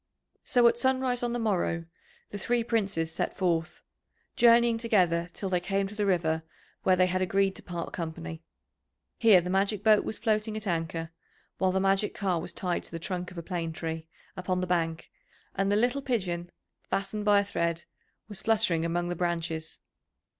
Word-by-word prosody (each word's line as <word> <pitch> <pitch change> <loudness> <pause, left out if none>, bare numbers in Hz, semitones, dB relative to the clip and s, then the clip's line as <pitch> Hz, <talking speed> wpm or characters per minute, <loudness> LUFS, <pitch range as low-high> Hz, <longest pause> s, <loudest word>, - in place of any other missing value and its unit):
So 245 -1 +4
at 235 - +2
sunrise 260 -1 +1
on 240 -1 -1
the 240 - -1
morrow 185 -7 0 0.5
the 205 - -5
three 240 +3 +1
Princes 195 -9 -1
set - - -2
forth, 170 -3 -1 0.5
journeying 235 -1 +5
together 180 -7 +2
till 195 - -5
they 180 -1 +1
came 195 +2 -1
to 200 - -9
the 210 -1 -1
river 160 -4 +1 0.4
where 185 - +4
they 185 0 +4
had 185 +1 -1
agreed 195 +1 +1
to - - -11
part 170 -2 -6
company. 160 - -5 0.8
Here 215 -6 +7
the 180 +1 -4
magic 195 +1 +1
boat 215 -1 +5
was - - -4
floating 215 -1 0
at 215 - -6
anchor, 165 -2 -2 0.5
while 190 -1 +3
the 190 - +1
magic 195 +2 +1
car 185 -5 0
was - - -6
tied 180 -3 -2
to - - -13
the 165 - -4
trunk 180 +1 -4
of 180 - -13
a 170 - -5
plane 165 -2 -3
tree 160 0 -5 0.3
upon 185 0 -1
the 185 - 0
bank, 165 -2 -1 0.4
and 195 +1 0
the - - +3
little 245 +6 +2
pigeon, 180 -10 -2 0.4
fastened 200 +2 -2
by 205 -1 +5
a - - +2
thread, 170 -4 -1 0.4
was 205 -3 -6
fluttering 215 -7 +2
among 175 +1 -1
the 175 - -2
branches. 165 -2 -3
185 Hz, 185 wpm, -28 LUFS, 170-210 Hz, 0.8 s, Here